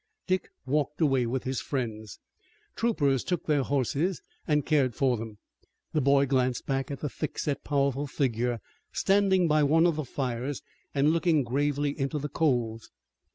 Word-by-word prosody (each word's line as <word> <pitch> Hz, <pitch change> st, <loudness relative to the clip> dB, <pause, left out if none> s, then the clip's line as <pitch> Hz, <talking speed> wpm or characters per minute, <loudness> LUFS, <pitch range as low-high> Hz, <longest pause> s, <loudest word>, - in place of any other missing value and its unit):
Dick 185 Hz, -1 st, 0 dB, 0.2 s
walked 145 Hz, +2 st, 0 dB
away 135 Hz, -6 st, +2 dB
with 130 Hz, +2 st, -2 dB
his 130 Hz, 0 st, -2 dB
friends. 110 Hz, -7 st, -4 dB, 0.6 s
Troopers 145 Hz, -, +1 dB
took 180 Hz, -3 st, -2 dB
their 150 Hz, -2 st, +2 dB
horses 140 Hz, +7 st, 0 dB, 0.2 s
and 150 Hz, -2 st, +2 dB
cared 140 Hz, -6 st, +2 dB
for 130 Hz, -3 st, +2 dB
them. 110 Hz, -2 st, -7 dB, 0.6 s
The 155 Hz, -, +2 dB
boy 140 Hz, +1 st, +4 dB
glanced 130 Hz, -2 st, 0 dB
back 135 Hz, -1 st, -1 dB
at 140 Hz, -, -6 dB
the 150 Hz, -, -1 dB
thickset, 145 Hz, 0 st, -3 dB
powerful 140 Hz, 0 st, 0 dB
figure, 120 Hz, -4 st, -1 dB, 0.3 s
standing 195 Hz, -2 st, +3 dB
by 155 Hz, -1 st, +3 dB
one 160 Hz, +3 st, +4 dB
of 170 Hz, -3 st, +2 dB
the 155 Hz, -, -2 dB
fires 130 Hz, +1 st, -3 dB, 0.3 s
and 140 Hz, +2 st, +4 dB
looking 165 Hz, -3 st, +2 dB
gravely 145 Hz, +3 st, 0 dB
into 135 Hz, +2 st, -1 dB
the 150 Hz, 0 st, -3 dB
coals. 120 Hz, -8 st, 0 dB
140 Hz, 155 wpm, -28 LUFS, 130-150 Hz, 0.6 s, boy